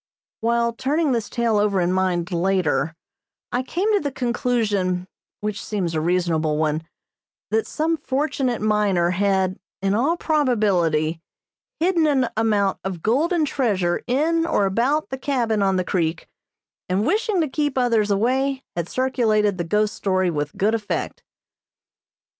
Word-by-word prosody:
While 235 +1 +1
turning 290 +5 0
this 230 -4 -1
tale 230 -3 +1
over 205 -2 +2
in 175 0 +1
mind 185 -2 0
later, 170 -4 +1 0.6
I 245 - 0
came 370 +11 -1
to 410 - +4
the 285 -1 -3
conclusion, 220 -8 0 0.3
which 210 -1 -3
seems 190 -6 -2
a 155 - 0
reasonable 165 -3 +1
one, 155 0 0 0.7
that 220 0 +1
some 320 +1 0
fortunate 265 -4 -1
miner 205 -5 +2
had, 190 0 +1 0.2
in 195 0 0
all 275 +11 +1
probability, 190 - +1 0.6
hidden 335 -1 +2
an 265 -4 +2
amount 210 -3 +1
of 185 -4 -5
golden 310 +8 +2
treasure 200 -12 0
in 315 +6 +2
or 205 -11 +2
about 245 +10 +1
the 265 0 -5
cabin 235 -6 0
on 195 -1 +2
the 185 - +1
creek, 170 -3 -1 0.6
and 190 +4 +1
wishing 420 - +1
to 315 - +1
keep 290 -1 -1
others 230 -4 +2
away, 260 +6 +1
had 170 +1 -3
circulated 220 -7 +1
the - - 0
ghost 210 +4 +1
story 185 -2 0
with 145 -2 -3
good 210 +3 +2
effect. 215 -2 -3
215 Hz, 145 wpm, -22 LUFS, 185-260 Hz, 0.7 s, to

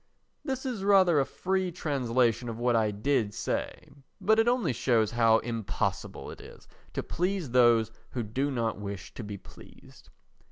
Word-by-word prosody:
This 265 0 -3
is 240 -7 -3
rather 190 -6 +5
a 135 - +2
free 190 -1 -1
translation 125 -7 0
of 115 - -5
what 120 0 +1
I 110 -2 +3
did 105 0 0
say; - - -3 0.3
but 220 +3 +3
it 225 - +3
only 240 - +2
shows 115 -3 +2
how 115 -1 +4
impossible 115 -3 -3
it - - -11
is - - -14 0.3
to - - -2
please 180 -5 -2
those 120 -3 +4 0.2
who 120 - -3
do 130 +7 -1
not 115 -5 -1
wish 100 -2 -7
to 120 - -7
be 105 -1 -6
pleased. - - -16
125 Hz, 165 wpm, -29 LUFS, 115-180 Hz, 0.3 s, rather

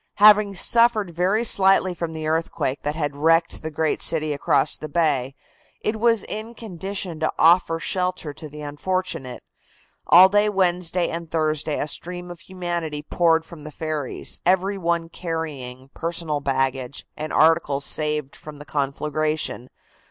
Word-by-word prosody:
Having 210 -1 +6
suffered 230 -2 +3
very 185 +7 +1
slightly 190 -4 +4
from 170 -2 -5
the 155 -1 -5
earthquake 155 -3 -1
that 150 +1 -3
had 145 -3 -2
wrecked 165 +3 +2
the 160 - -4
great 155 0 -1
city 155 -2 +1
across 145 +1 +1
the 155 - -8
bay, 140 -5 0 0.4
it 215 +1 -2
was 230 -2 +3
in 220 +2 -6
condition 190 -4 -6
to 155 - 0
offer 165 0 +4
shelter 180 -3 -2
to 155 +1 -10
the 150 +1 -10
unfortunate. 145 -3 -3 0.6
All 185 +2 +9
day 205 +2 +2
Wednesday 180 -3 +1
and 165 -1 -5
Thursday 155 -2 -1
a - - -1
stream 180 +3 -5
of 175 - -10
humanity 175 -5 -4
poured 165 0 +2
from 165 -1 -11
the 155 - -8
ferries, 155 -4 -4
every 190 +3 +2
one 170 -3 -1
carrying 145 -7 -6
personal 165 -3 -2
baggage 135 -2 -1
and 155 +1 -5
articles 155 -3 +3
saved 150 -2 -1
from 150 -1 -10
the 145 - -11
conflagration. 150 -1 -2
165 Hz, 150 wpm, -23 LUFS, 150-180 Hz, 0.6 s, All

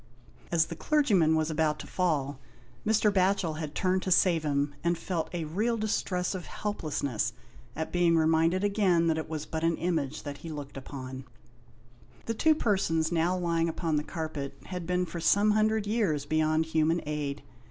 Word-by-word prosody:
As 165 -2 +3
the 165 - -7
clergyman 200 - +3
was 160 0 0
about 155 -1 +1
to - - -8
fall, 145 -7 -1 0.5
Mr. 215 -1 +3
Batchel 185 -4 +1
had 155 -2 -5
turned 185 0 +1
to 185 - -3
save 175 -2 +4
him, 145 -1 0
and 170 0 +1
felt 170 -1 -3
a 175 -2 -3
real 210 +10 0
distress 195 -4 -1
of 185 -2 -6
helplessness 140 - -2 0.4
at 160 +1 -3
being 175 -2 +3
reminded 165 +3 +3
again 195 -5 +3
that 160 -1 +2
it 160 - -6
was 155 -2 -4
but 160 0 -4
an 165 0 +2
image 155 -5 -2
that 145 -2 -6
he - - -9
had 155 -2 -5
looked 140 -1 -8
upon. 130 -1 -7 1.0
The 230 - -1
two 315 +7 +3
persons 190 - +1
now 170 +2 +1
lying 170 -2 +1
upon 160 -1 -1
the 150 - 0
carpet 155 -3 -5
had 180 -3 -6
been 180 0 +1
for 170 0 -6
some 205 +5 +4
hundred 215 0 +2
years 205 -10 0
beyond 155 +1 +2
human 160 +1 +1
aid. 145 -1 -3
165 Hz, 180 wpm, -29 LUFS, 155-185 Hz, 1.0 s, save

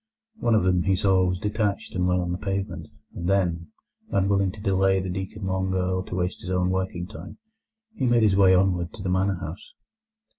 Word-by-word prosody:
One 115 - +2
of 110 - +3
them, 90 -1 +2
he 95 +2 +2
saw, 95 0 +3
was 90 0 -1
detached, 105 +1 -2
and 90 0 0
lay 90 - +2
on 90 -1 -1
the 90 - -3
pavement. 95 -2 -3 0.3
And 85 +1 -4
then, 90 -4 +1 0.4
unwilling 100 -1 +2
to 110 - -11
delay 95 -1 +2
the 95 -1 -3
deacon 95 +3 -5
longer 95 0 -1
or 95 0 -1
to - - -6
waste 90 0 -2
his 95 - -7
own 90 0 +1
working 95 -2 -2
time, 95 - -10 0.6
he 130 - -1
made 120 -1 +4
his 105 -3 +4
way 95 -1 +6
onward 90 -2 +1
to 105 - -8
the 95 - -2
manor 95 +1 +1
house. 85 +3 -8
95 Hz, 210 wpm, -25 LUFS, 90-100 Hz, 0.6 s, way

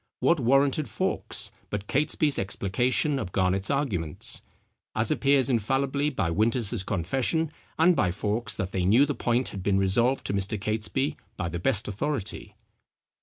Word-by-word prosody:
What 170 - +3
warranted 135 +3 +2
Faukes, - - -1 0.2
but 105 -1 -4
Catesby's 150 +3 +1
explication 120 +9 0
of 100 -8 -5
Garnet's 95 +1 0
arguments? 100 - -2 0.5
As 110 +7 0
appears 140 -3 +3
infallibly 135 +4 +1
by 105 - -1
Winter's 110 +1 +1
confession, 130 - -1 0.3
and 170 +2 +5
by 95 - +2
Faukes, 105 +4 -1
that 95 -1 -3
they 95 - -1
knew 115 +10 +5
the 145 - -2
point 120 0 0
had 95 - -6
been 95 +1 +1
resolved 115 +7 +1
to - - -1
Mr. 100 +1 +1
Catesby, 110 +7 -1 0.2
by 85 - -2
the 85 +1 -4
best 95 +3 +1
authority." 105 +2 -3
115 Hz, 150 wpm, -27 LUFS, 95-140 Hz, 0.5 s, and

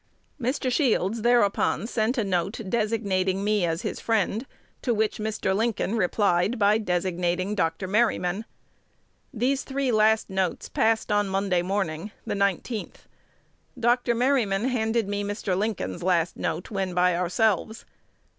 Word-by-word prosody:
Mr. 255 +1 -1
Shields 230 - +1
thereupon 235 -3 +2
sent 230 +2 0
a 230 - +2
note 195 +2 -1
designating 200 -4 0
me 205 -3 +2
as 165 +1 -2
his - - -3
friend, 225 +2 0 0.3
to 240 -3 0
which 220 0 0
Mr. 215 -3 -1
Lincoln 225 -1 0
replied 200 +1 +1
by 210 0 +4
designating 180 0 -1
Dr. 185 -1 -1
Merryman. 210 -1 +1 0.9
These 260 +3 0
three 270 -1 -1
last 220 0 +3
notes 190 -3 -2
passed 225 0 +1
on 205 -1 +2
Monday 190 -2 +1
morning, 180 -1 -2 0.2
the - - -2
19th. 200 +3 -2 0.7
Dr. 240 0 +2
Merryman 240 -3 +1
handed 225 -3 0
me 205 0 -2
Mr. 205 -2 -2
Lincoln's 205 -3 -2
last 175 -2 +1
note 165 +3 -3
when 190 -3 -2
by 180 0 +3
ourselves. 210 +4 0
205 Hz, 135 wpm, -26 LUFS, 185-225 Hz, 0.9 s, by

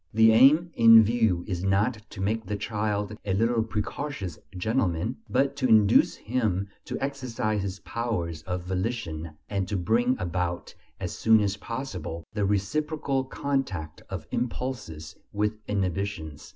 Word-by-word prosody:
The 110 +1 +6
aim 145 +9 +6
in 115 -1 +8
view 110 -6 +1
is 90 -3 -3
not 105 +4 +1
to 95 - -8
make 110 +3 0
the 105 - -2
child 105 0 -2
a 95 -2 0
little 115 +2 +2
precocious 105 - -4 0.2
"gentleman," 105 -1 0
but 140 0 +1
to 130 -2 +1
induce 110 -2 +5
him 105 -5 -1 0.2
to - - -4
exercise 125 -6 -2
his 95 0 -5
powers 90 -9 -3
of 90 -1 -2
volition, 90 -5 -3
and 100 -2 -2
to 100 0 -1
bring 120 +8 +2
about 90 -1 -3 0.3
as 90 -2 -4
soon 110 -1 +5
as 100 -1 0
possible 100 - -5
the 105 -2 0
reciprocal 135 +7 0
contact 130 - -3
of - - -5
impulses 120 -11 -4 0.2
with 105 +1 -1
inhibitions. 95 -6 -3
105 Hz, 140 wpm, -27 LUFS, 95-120 Hz, 0.3 s, in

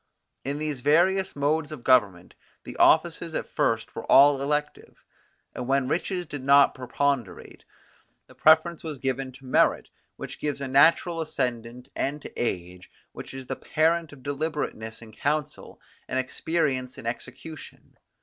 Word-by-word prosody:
In 140 +2 -3
these 150 -3 -3
various 185 +8 +2
modes 145 +2 0
of 150 -6 -8
government 100 -9 +2 0.3
the - - -9
offices - - +3
at - - -3
first - - -1
were - - -5
all 140 0 +6
elective; 150 +1 -3 0.5
and 125 - -6
when 135 -1 +1
riches 180 +4 -2
did 145 -5 -7
not 140 +1 +5
preponderate, 135 0 -3 0.6
the - - -18
preference 160 +2 +4
was 155 -3 -5
given 130 0 -3
to 135 +1 -15
merit, 130 - +2 0.2
which - - -8
gives 145 -1 -2
a 140 - -4
natural 165 +5 +4
ascendant, 125 -4 -4
and 145 +2 -2
to - - -9
age, 90 -5 -4 0.2
which - - -9
is 135 -1 -8
the - - -4
parent 165 +1 0
of 140 -3 -14
deliberateness 145 -6 -4
in 110 - -13
council, 145 +6 -3 0.3
and 130 - -2
experience 130 -1 -1
in 130 - -10
execution. 155 +6 -7
140 Hz, 150 wpm, -26 LUFS, 130-155 Hz, 0.6 s, all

